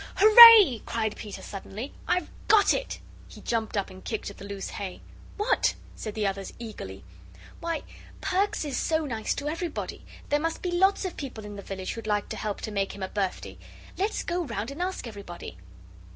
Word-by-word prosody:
"Hooray!" 430 - +10
cried 220 -2 -2
Peter, 210 -3 -8
suddenly, 210 +6 -7
"I've 360 -3 +1 0.2
got 425 -2 +6
it." - - -3 0.3
He - - -13
jumped 225 -2 -2
up 200 - -2
and 185 0 -12
kicked 220 -2 -4
at - - -15
the 195 - -8
loose 200 -1 -5
hay. 190 -3 -6 0.4
"What?" 420 - +2 0.2
said 215 -2 -6
the 215 -1 -1
others, 195 0 -3
eagerly. 200 - -8 0.6
"Why, 335 -2 -3 0.4
Perks 385 -2 0
is 280 -3 -3
so 315 -1 0
nice 225 -5 -2
to 285 - -4
everybody. 330 +1 -4 0.3
There 290 - +2
must 325 +2 -3
be 360 - -1
lots 385 +3 +3
of 365 - -5
people 250 -7 -7
in 205 0 -8
the 200 - -7
village 190 -1 -5
who'd 230 -1 -8
like 205 -1 0
to - - -4
help 210 -2 -4
to 215 - -5
make 195 -1 -2
him 200 - -6
a 190 - -3
birthday. 195 -3 -3 0.4
Let's 400 +4 -1
go 350 +1 -1
round 255 -5 -4
and 290 +5 -7
ask 370 -4 -3
everybody." 200 - -9
230 Hz, 195 wpm, -27 LUFS, -, 0.6 s, Hooray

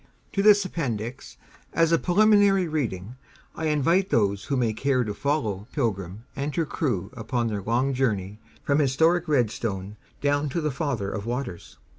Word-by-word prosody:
To 195 - +1
this 205 -1 +6
Appendix, 125 - -4 0.4
as 165 0 +3
a 165 - +4
preliminary 200 -1 +4
reading, 120 - -3 0.4
I 160 - -3
invite 165 +6 +2
those 100 - +1
who 140 - -1
may 115 -3 +1
care 130 +2 +1
to 105 -2 -3
follow 110 -7 -2
"Pilgrim" 100 - -2
and 140 +1 -3
her 165 - +1
crew 125 - -2
upon 120 -1 -2
their 105 -2 -3
long 120 +7 0
journey 105 -6 -1 0.2
from 140 +1 +2
historic 160 +5 +2
Redstone 110 -7 -1 0.2
down 145 +1 +1
to 155 - -2
the 150 -2 -1
Father 130 -8 -2
of 100 +1 -5
Waters. 120 -8 -5
130 Hz, 160 wpm, -25 LUFS, 110-155 Hz, 0.4 s, this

